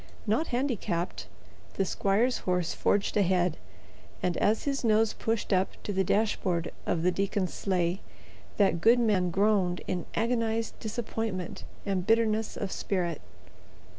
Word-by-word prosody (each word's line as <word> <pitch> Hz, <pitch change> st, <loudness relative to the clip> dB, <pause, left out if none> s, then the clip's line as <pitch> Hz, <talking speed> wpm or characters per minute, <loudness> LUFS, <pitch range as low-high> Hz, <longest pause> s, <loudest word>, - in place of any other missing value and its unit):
Not 225 Hz, +9 st, +1 dB
handicapped, 210 Hz, -, -2 dB, 0.5 s
the 195 Hz, -, +1 dB
squire's 205 Hz, +7 st, +1 dB
horse 180 Hz, -2 st, 0 dB
forged 200 Hz, 0 st, +1 dB
ahead, 180 Hz, -3 st, +2 dB, 0.7 s
and 180 Hz, -1 st, +1 dB
as 215 Hz, +2 st, +2 dB
his 275 Hz, -2 st, -1 dB
nose 220 Hz, -1 st, +3 dB
pushed 225 Hz, -2 st, -1 dB
up 185 Hz, 0 st, +2 dB
to 205 Hz, -, -3 dB
the 190 Hz, 0 st, +2 dB
dashboard 185 Hz, -4 st, 0 dB, 0.2 s
of 165 Hz, -2 st, 0 dB
the 180 Hz, -, +4 dB
deacon's 195 Hz, 0 st, -1 dB
sleigh, 180 Hz, -1 st, 0 dB, 0.6 s
that 190 Hz, -5 st, +3 dB
good 230 Hz, +5 st, +6 dB
man 205 Hz, -6 st, +2 dB
groaned 190 Hz, -1 st, +2 dB
in 180 Hz, -2 st, -3 dB
agonized 230 Hz, -1 st, 0 dB
disappointment 220 Hz, -4 st, -4 dB, 0.2 s
and 190 Hz, -3 st, -1 dB
bitterness 225 Hz, -1 st, +2 dB
of 200 Hz, -2 st, -3 dB
spirit. 175 Hz, -5 st, -2 dB
200 Hz, 135 wpm, -29 LUFS, 180-225 Hz, 0.7 s, good